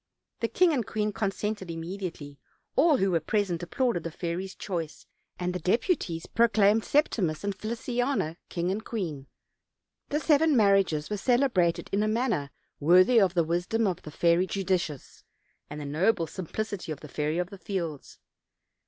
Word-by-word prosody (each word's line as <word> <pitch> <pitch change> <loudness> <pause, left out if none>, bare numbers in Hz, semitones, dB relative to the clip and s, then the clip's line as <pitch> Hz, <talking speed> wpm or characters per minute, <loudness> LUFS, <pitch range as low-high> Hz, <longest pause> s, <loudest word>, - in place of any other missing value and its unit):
The 230 - 0
king 355 +5 +3
and 255 -5 +1
queen 210 0 -2
consented 205 -2 -2
immediately; 165 -4 -6 0.4
all 300 0 +5
who 195 -3 +1
were 170 - +3
present 180 0 -1
applauded 235 +1 0
the 165 - -4
fairy's 175 +3 -4
choice, 165 -6 -5 0.3
and 180 0 -2
the 180 - -3
deputies 180 - 0
proclaimed 220 -2 +3
Septimus 200 - +1
and 200 0 -1
Feliciana 235 - -2
king 175 +1 -1
and 210 +3 -3
queen. 160 - -4 0.8
The 295 - 0
seven 310 -2 +3
marriages 195 -7 +3
were 210 - 0
celebrated 240 -8 +2
in 200 - +2
a 215 - +1
man 235 +3 +1
ner 145 -8 -1 0.3
worthy 185 - +6
of 185 -2 +2
the 170 - +4
wisdom 175 +8 0
of 185 -4 -1
the - - -9
Fairy 170 +4 +2
Judicious, 180 -7 -2 0.5
and 150 - -6
the 150 - -5
noble 165 +5 +1
simplicity 190 +1 -5
of 150 - -6
the 150 - -9
Fairy 150 +2 -2
of 180 +2 -2
the 200 - -10
Fields. 170 -8 -5
190 Hz, 160 wpm, -28 LUFS, 170-220 Hz, 0.8 s, worthy